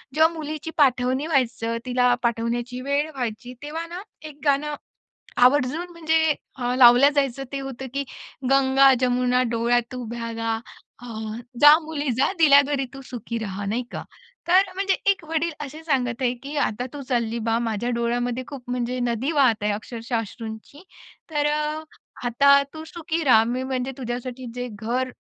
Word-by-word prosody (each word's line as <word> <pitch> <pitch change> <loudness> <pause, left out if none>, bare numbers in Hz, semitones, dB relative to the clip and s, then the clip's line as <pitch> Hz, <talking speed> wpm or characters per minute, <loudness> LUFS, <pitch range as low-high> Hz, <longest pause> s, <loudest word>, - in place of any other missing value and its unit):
जेव्हा 320 +2 +4
मुलीची 310 0 -5
पाठवणी 260 0 +2
व्हायचं, 245 -6 0
तिला 250 -1 +3
पाठवण्याची 235 +1 -1
वेळ 280 +3 0
व्हायची 245 0 -4
तेव्हा 320 +3 -4
ना 350 +2 -7 0.3
एक 295 -1 -15
गाणं 290 +1 +1 0.6
आवर्जून 265 +6 +3
म्हणजे 320 -2 +2 0.2
अ, 245 -1 -1
लावलं 250 +2 +8
जायचं, 275 -2 0
ते 275 - -3
होतं 270 -1 -6
की 280 0 -1 0.5
"गंगा-जमुना 260 -2 +4
डोळ्यात 240 +2 +1
उभ्या 235 -1 -5
गा 225 0 -1 0.5
अ, 245 - -10 0.5
जा 295 0 +10
मुली 295 -3 -2
जा 275 - +3
दिल्या 285 -3 +8
घरी 280 -1 -1
तू 270 - -9
सुखी 235 -1 -5
रहा," 205 -2 -5
नाही 225 +5 -1
का. - - -5 0.4
तर 370 +2 +4
म्हणजे 390 0 +1 0.2
एक 385 -4 -5
वडील 325 +1 0
असे 305 +4 -10
सांगत 255 -5 -1
आहे 245 -1 +2
की 285 +2 -6
"आता 245 +4 -4
तू 290 - -6
चालली 235 -2 0
बा, 225 - +2
माझ्या 230 0 -2
डोळ्यामध्ये 240 +1 -1
खूप 275 -3 -8
म्हणजे 250 0 -2
नदी 235 +6 -1
वाहत 255 -9 +3
आहे, 210 - +2
अक्षरशः 230 +3 -4
अश्रूंची. 225 - -8 0.5
तर 295 -1 +1
अ, 300 +1 -2 0.4
आता 280 +4 +5
तू 315 0 -7
सुखी 330 -1 -2
रहा. 235 -6 +6
मी 245 +3 -2
म्हणजे 260 0 -2
तुझ्यासाठी 250 +1 -5
जे 250 0 -3
घर 245 +5 -2
255 Hz, 160 wpm, -24 LUFS, 240-290 Hz, 0.6 s, जा